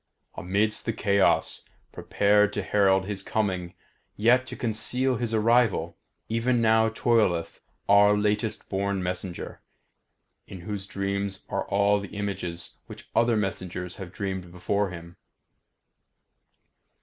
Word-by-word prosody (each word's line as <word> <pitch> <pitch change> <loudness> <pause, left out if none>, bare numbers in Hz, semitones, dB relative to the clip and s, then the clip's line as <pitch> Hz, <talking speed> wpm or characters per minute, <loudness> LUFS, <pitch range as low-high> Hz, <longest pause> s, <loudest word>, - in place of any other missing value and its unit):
Amidst 105 +6 0
this 115 - -1
chaos, 100 -1 +2 0.3
prepared 105 0 +2
to 105 - -2
herald 95 -1 +3
his 100 -1 -4
coming 95 -4 -2 0.4
yet 125 +4 +3
to - - -7
conceal 125 +3 -1
his 120 -2 -3
arrival, 110 -6 +2 0.3
even 115 +2 +1
now 110 0 +4
toileth 110 -8 +1 0.3
our 105 +1 +6
latest 105 +1 -1
born 100 -1 -1
messenger, 90 0 -5 0.9
in 95 - -9
whose 100 +1 -5
dreams 100 0 -3
are - - -2
all 100 +1 +2
the 100 0 -9
images 90 -4 -4
which - - -12
other 115 -1 +3
messengers 95 -3 -3
have 95 -3 -8
dreamed 95 -3 -5
before 95 +3 -1
him. 85 -1 -10
100 Hz, 120 wpm, -26 LUFS, 95-110 Hz, 0.9 s, our